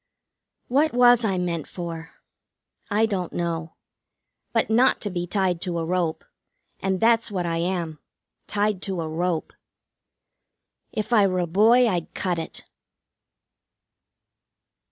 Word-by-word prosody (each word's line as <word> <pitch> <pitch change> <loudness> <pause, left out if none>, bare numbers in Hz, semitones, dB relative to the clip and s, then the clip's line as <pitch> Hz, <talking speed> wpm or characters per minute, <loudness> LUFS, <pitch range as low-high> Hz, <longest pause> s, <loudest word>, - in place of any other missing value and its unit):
What 285 +4 +2
was 245 -1 +6
I 195 -4 +1
meant 170 -3 -2
for? 165 -2 -7 0.7
I 215 +1 +3
don't 190 -5 -2
know. 165 -1 -3 0.8
But 225 - +1
not 240 +4 +4
to 205 - -3
be 175 -1 -3
tied 185 -3 0
to 175 -2 -2
a 165 - -1
rope. 170 -2 -1 0.5
And 190 -1 -1
that's 230 +2 +3
what 185 -4 -2
I 165 -1 -1
am. 170 -3 -2 0.5
Tied 205 -2 0
to 190 -3 -3
a 160 - -3
rope. 165 +1 -2 1.4
If 215 +2 -3
I 205 -3 +6
were 185 -1 -1
a 180 - +1
boy 225 +8 +5
I'd 175 -6 -2
cut 180 -3 -1
it. 160 - -6
185 Hz, 135 wpm, -24 LUFS, 170-215 Hz, 1.4 s, was